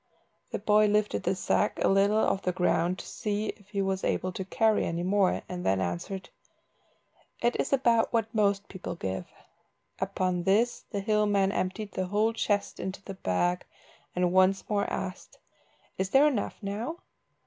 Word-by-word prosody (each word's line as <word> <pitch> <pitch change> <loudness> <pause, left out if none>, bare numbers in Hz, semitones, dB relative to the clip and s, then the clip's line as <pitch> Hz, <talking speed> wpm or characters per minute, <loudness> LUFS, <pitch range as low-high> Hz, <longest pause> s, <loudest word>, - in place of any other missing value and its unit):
The - - -2
boy 210 0 +4
lifted 210 0 +1
the 180 +2 0
sack 185 - +1
a - - +4
little 200 +2 +4
off 195 -2 +2
the 180 - 0
ground 180 0 +1
to - - -8
see 210 -1 -2
if 205 -2 -23
he 200 -2 -1
was 190 0 -1
able 185 - 0
to 190 - -4
carry 220 +3 +2
any 170 +1 -2
more, 190 0 +2
and 180 -1 -5
then 95 0 +2
answered 95 - -4 1.1
"It 240 +1 +1
is - - 0
about 235 -4 +3
what 225 -1 0
most 200 -2 +1
people 185 -2 -6
give." 95 - -4 0.7
Upon 185 -2 -1
this 210 +7 +1
the 200 - -3
hill 210 0 +2
man 195 -1 +2
emptied 200 +2 -2
the 185 0 -2
whole 210 +4 +1
chest 205 -2 -1
into 190 +1 -5
the 195 - -7
bag, 175 - 0 0.5
and 180 0 +1
once 185 +1 +3
more 205 -1 0
asked 190 0 -5 0.6
"Is 190 0 0
there 270 +7 +6
enough 270 -9 0
now?" 225 - -4
195 Hz, 170 wpm, -28 LUFS, 185-210 Hz, 1.1 s, there